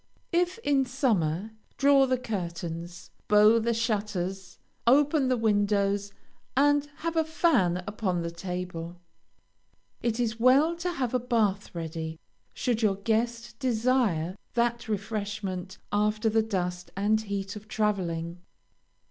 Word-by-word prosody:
If 355 +2 +1
in 280 -2 +3
summer, 215 - 0 0.3
draw 275 -1 +5
the 255 0 +1
curtains, 175 -5 -5 0.2
bow 210 +2 +6
the 235 +1 0
shutters, 200 -5 -2 0.3
open 285 +2 +4
the 255 -1 +2
windows, 205 -2 +1 0.5
and 290 +1 +4 0.2
have 335 0 -1
a 320 - +3
fan 280 - +2
upon 195 -4 -2
the 170 - -3
table. 175 -1 -5 1.0
It 235 0 -1
is 230 -1 -1
well 275 +7 +5
to 350 +1 -2
have 255 -6 -2
a 250 - +2
bath 215 -6 0
ready, 160 -1 -5 0.3
should 240 -2 -1
your 210 -3 +3
guest 230 +3 -1
desire 230 - +1 0.2
that 235 -1 0
refreshment 200 -3 -3
after 210 +1 +1
the 225 +1 +3
dust 180 -4 -3
and 215 +2 +2
heat 200 -1 -4
of 210 +1 -10
traveling. 180 -7 -1
210 Hz, 125 wpm, -28 LUFS, 185-245 Hz, 1.0 s, bow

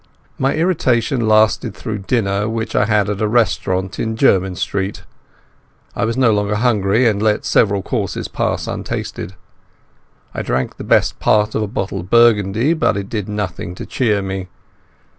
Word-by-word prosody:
My 135 +1 +1
irritation 130 -8 +1
lasted 110 0 +3
through 110 -3 -5
dinner, 100 -1 0
which 115 0 -3
I 105 - +3
had 105 -2 +2
at 105 0 -3
a 110 - +2
restaurant 95 -4 0
in 110 0 -2
Jermyn 95 -7 +3
Street. 95 +2 -3 0.9
I 100 - 0
was 115 +2 -2
no 130 -4 +4
longer 105 0 0
hungry, 110 0 +2
and 105 -2 +1
let 105 -1 +1
several 100 -3 +2
courses 105 -4 -3
pass - - -2
untasted. 95 - -5 1.0
I - - -3
drank 65 0 -2
the - - -7
best - - +2
part 105 0 +2
of - - -1
a 105 - -1
bottle 100 -2 -3
of 90 +1 -9
Burgundy, 115 - +4
but 160 - +1
it 100 -1 -5
did 105 -3 -4
nothing 95 -4 -4
to - - -7
cheer 105 -6 0
me. 95 -1 -4
105 Hz, 165 wpm, -18 LUFS, 100-115 Hz, 1.0 s, no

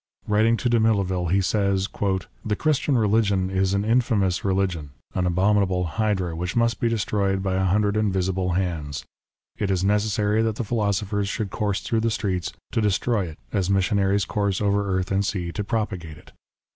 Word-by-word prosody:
Writing 110 +2 +3
to 125 - -1
Damilaville, 100 -7 +2
he 95 +3 +3
says, 100 0 +1 0.3
" 95 - -13
The 105 -1 0
Christian 145 0 +1
religion 100 -4 +2
is 95 0 +1
an 100 +1 0
infamous 110 -6 +1
religion, 95 -6 0 0.2
an 90 -1 0
abominable 95 0 +2
hydra 95 -2 -1
which 90 +2 -3
must 115 -2 +2
be 115 - +1
destroyed 100 -3 0
by 95 -1 0
a 95 0 +1
hundred 100 +2 +2
invisible 95 -3 0
hands. 85 -6 -2 0.5
It 100 - 0
is 95 -1 +1
necessary 105 +1 +1
that 110 -1 0
the 120 - -2
philosophers 105 -2 -1
should 105 -1 -3
course 105 -3 -1
through 115 - 0
the 115 +1 +1
streets 95 -6 -2 0.2
to 115 - 0
destroy 105 0 +1
it 80 - -9 0.2
as 95 -3 0
missionaries 100 0 +2
course 100 -2 -1
over 100 -1 +1
earth 95 0 -1
and 100 +1 +2
sea 90 -4 -2
to 105 - -3
propagate 100 -8 -3
it. - - -17
100 Hz, 175 wpm, -24 LUFS, 95-105 Hz, 0.5 s, Writing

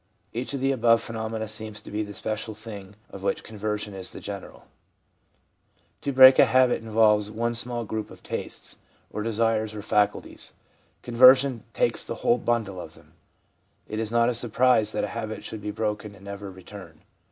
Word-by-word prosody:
Each 125 +4 -3
of 135 - -4
the 135 +1 +2
above 115 -3 +4
phenomena 110 -1 -4
seems 110 0 -6
to - - -10
be 105 +1 -1
the 105 -1 -6
special 110 +1 -3
thing 105 -2 -9 0.2
of 100 - -9
which 100 0 -1
conversion 105 -1 -4
is 95 -1 -5
the - - -8
general. 100 -2 -8 1.4
To 140 - -2
break 130 0 +9
a - - +9
habit 130 -2 +3
involves 105 -2 +3
one 115 +2 -1
small 120 0 -3
group 110 0 -4
of - - -14
tastes, - - -6 0.3
or 105 - -4
desires, 110 -1 0
or 105 - -6
faculties; 105 -1 -1 0.5
conversion 130 0 +5
takes - - 0
the - - -4
whole 120 - +4
bundle 110 -6 -1
of - - -11
them. - - -20 0.7
It 110 - -4
is 110 -1 -3
not 115 0 +3
a 125 - +1
surprise 120 -1 +2
that - - -1
a - - -2
habit 110 -2 -5
should 110 - -7
be 105 - -4
broken 105 -1 -3
and 100 0 -16
never 100 0 -7
return. 95 -3 -12
110 Hz, 180 wpm, -26 LUFS, 105-115 Hz, 1.4 s, break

